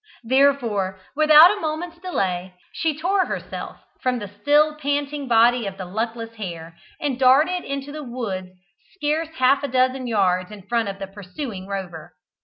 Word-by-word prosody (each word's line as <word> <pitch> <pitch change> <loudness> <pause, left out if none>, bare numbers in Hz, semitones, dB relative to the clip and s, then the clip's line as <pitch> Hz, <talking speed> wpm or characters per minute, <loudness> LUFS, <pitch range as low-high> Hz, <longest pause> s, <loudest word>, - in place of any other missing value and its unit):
Therefore, 230 -7 +2 0.2
without 310 +5 +8
a - - -7
moment's 330 +2 -4
delay, 185 - -2 0.2
she 315 -3 -1
tore 370 +4 +1
herself - - -6 0.2
from 255 -1 0
the 205 -3 -6
still 300 +1 +4
panting 285 -1 -2
body 235 -1 +4
of 195 -1 -6
the 185 - -6
luckless 225 +4 -4
hare, 170 -5 -7 0.2
and 275 -4 -2
darted 295 +8 +4
into 275 +1 -5
the 305 +1 -6
wood 220 -8 -5 0.5
scarce 310 -1 -1
half 260 +2 +3
a 285 - -2
dozen 255 0 +1
yards 185 -5 +1
in 210 -2 -11
front 230 +1 -1
of 195 - -6
the 195 - -5
pursuing 195 +1 -7
Rover. 180 -6 -6
250 Hz, 160 wpm, -22 LUFS, 195-295 Hz, 0.5 s, without